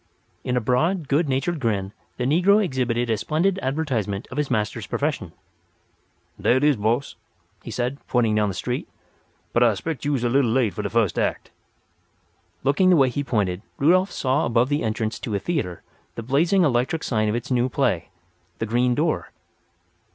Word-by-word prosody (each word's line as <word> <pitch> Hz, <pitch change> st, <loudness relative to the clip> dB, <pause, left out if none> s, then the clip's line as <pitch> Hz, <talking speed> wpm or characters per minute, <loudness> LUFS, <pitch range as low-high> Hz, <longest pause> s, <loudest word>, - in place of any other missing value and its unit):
In 125 Hz, 0 st, -1 dB
a -, -, +1 dB
broad, 155 Hz, -, +1 dB
good 145 Hz, +2 st, +1 dB
natured 145 Hz, +6 st, -1 dB
grin 105 Hz, -6 st, -1 dB, 0.2 s
the 125 Hz, -, -2 dB
negro 180 Hz, +10 st, +4 dB
exhibited 120 Hz, -5 st, -1 dB
a 110 Hz, -, +1 dB
splendid 165 Hz, -, 0 dB
advertisement 130 Hz, -, -2 dB
of 130 Hz, -, -7 dB
his 150 Hz, -, -1 dB
master's 110 Hz, -4 st, -1 dB
profession. -, -, -2 dB, 1.1 s
"Dar -, -, +4 dB
it 130 Hz, +2 st, +1 dB
is, 150 Hz, -1 st, +4 dB
boss," 115 Hz, +5 st, -1 dB, 0.4 s
he -, -, -9 dB
said, 125 Hz, +3 st, -2 dB
pointing 115 Hz, -3 st, +2 dB
down 105 Hz, -1 st, +2 dB
the 95 Hz, -, -4 dB
street. 125 Hz, +6 st, -3 dB, 0.6 s
"But 120 Hz, -, +2 dB
I 120 Hz, -2 st, +6 dB
'spect 150 Hz, +4 st, -5 dB
you 145 Hz, 0 st, +1 dB
is 125 Hz, -, -2 dB
a 120 Hz, -, +2 dB
little 130 Hz, -1 st, +3 dB
late 115 Hz, -3 st, +1 dB
for -, -, -4 dB
de -, -, -3 dB
fust 115 Hz, -6 st, +1 dB
act." -, -, -2 dB, 1.1 s
Looking 145 Hz, +8 st, +3 dB
the 180 Hz, -, +6 dB
way 135 Hz, -4 st, +4 dB
he 145 Hz, +4 st, -2 dB
pointed 100 Hz, -8 st, -1 dB, 0.2 s
Rudolf 185 Hz, +7 st, +3 dB
saw 135 Hz, +3 st, 0 dB
above 120 Hz, +2 st, +2 dB
the 145 Hz, +1 st, 0 dB
entrance 110 Hz, 0 st, -2 dB
to 110 Hz, -, -3 dB
a -, -, 0 dB
theatre 135 Hz, -, -3 dB, 0.3 s
the 115 Hz, -, -5 dB
blazing 165 Hz, -, +2 dB
electric 130 Hz, +2 st, +1 dB
sign 110 Hz, -3 st, 0 dB
of 105 Hz, -, 0 dB
its 120 Hz, +2 st, -4 dB
new 125 Hz, 0 st, +2 dB
play, 90 Hz, -6 st, 0 dB, 0.5 s
"The 115 Hz, -, -2 dB
Green 120 Hz, +2 st, +1 dB
Door." 155 Hz, +3 st, 0 dB
125 Hz, 185 wpm, -23 LUFS, 115-145 Hz, 1.1 s, I